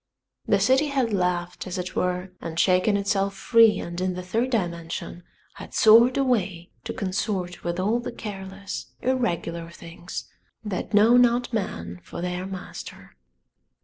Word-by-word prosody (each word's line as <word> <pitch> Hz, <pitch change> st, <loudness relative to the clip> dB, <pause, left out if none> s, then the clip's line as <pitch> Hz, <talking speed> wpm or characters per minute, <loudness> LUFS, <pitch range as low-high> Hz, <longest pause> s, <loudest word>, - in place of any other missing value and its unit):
The -, -, +3 dB
city 265 Hz, +4 st, +3 dB
had 265 Hz, -6 st, 0 dB
laughed 180 Hz, -1 st, -1 dB
as 185 Hz, -, -4 dB
it 180 Hz, 0 st, -5 dB
were 180 Hz, +1 st, -1 dB
and 165 Hz, 0 st, -4 dB
shaken 185 Hz, +3 st, +3 dB
itself 200 Hz, 0 st, 0 dB
free 230 Hz, +1 st, +5 dB
and 175 Hz, +1 st, -5 dB
in 185 Hz, -1 st, -1 dB
the 180 Hz, -, -5 dB
third 225 Hz, +8 st, 0 dB
dimension 170 Hz, -6 st, -3 dB, 0.3 s
had -, -, -10 dB
soared 235 Hz, +4 st, +7 dB
away 200 Hz, -10 st, 0 dB
to -, -, -3 dB
consort 185 Hz, -2 st, -3 dB
with 175 Hz, +1 st, -2 dB
all 215 Hz, +6 st, +1 dB
the 240 Hz, -, -5 dB
careless, 195 Hz, -2 st, -7 dB, 0.2 s
irregular 170 Hz, -10 st, -1 dB
things 170 Hz, +1 st, -8 dB, 0.4 s
that 205 Hz, +1 st, -3 dB
know 225 Hz, +4 st, +6 dB
not 245 Hz, 0 st, +3 dB
man 90 Hz, -, -3 dB
for -, -, -8 dB
their 180 Hz, +1 st, -3 dB
master. 190 Hz, -1 st, -9 dB
190 Hz, 145 wpm, -25 LUFS, 180-225 Hz, 0.4 s, soared